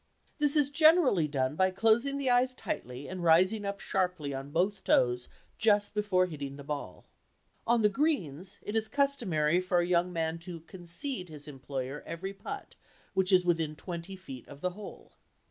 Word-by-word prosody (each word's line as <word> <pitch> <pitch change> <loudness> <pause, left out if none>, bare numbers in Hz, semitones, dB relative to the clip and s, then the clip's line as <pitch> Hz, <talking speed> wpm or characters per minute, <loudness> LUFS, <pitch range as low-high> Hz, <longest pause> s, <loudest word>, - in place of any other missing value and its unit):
This 295 0 +2
is 290 -2 +3
generally 310 - +5
done 135 -1 -1
by 185 +3 +3
closing 225 +8 +2
the 280 -1 -2
eyes 250 +1 +3
tightly 125 - -5
and 185 -1 -5
rising 185 +6 +4
up 200 0 -3
sharply 180 -7 -1
on 135 +1 -5
both 190 +6 0
toes 125 0 +2 0.3
just 205 -2 +3
before 205 -3 +2
hitting 145 -5 -6
the 140 - -9
ball. 140 -11 -6 0.6
On 235 -1 +3
the - - +7
"greens" 195 - -1
it 210 - -5
is 220 -1 +1
customary 190 - +1
for 185 -1 0
a 175 - +3
young 180 0 +2
man 165 -1 -2
to 170 -1 -8
"concede" 180 - -6
his 150 -2 -10
employer 135 0 -5
every 190 +4 -5
"putt" 195 - -7 0.4
which 190 0 +2
is 180 -1 +5
within 165 -3 +1
twenty 175 +3 -6
feet 135 -10 -10
of 145 0 -12
the 180 - 0
hole. 205 +3 -11
180 Hz, 175 wpm, -30 LUFS, 155-210 Hz, 0.6 s, the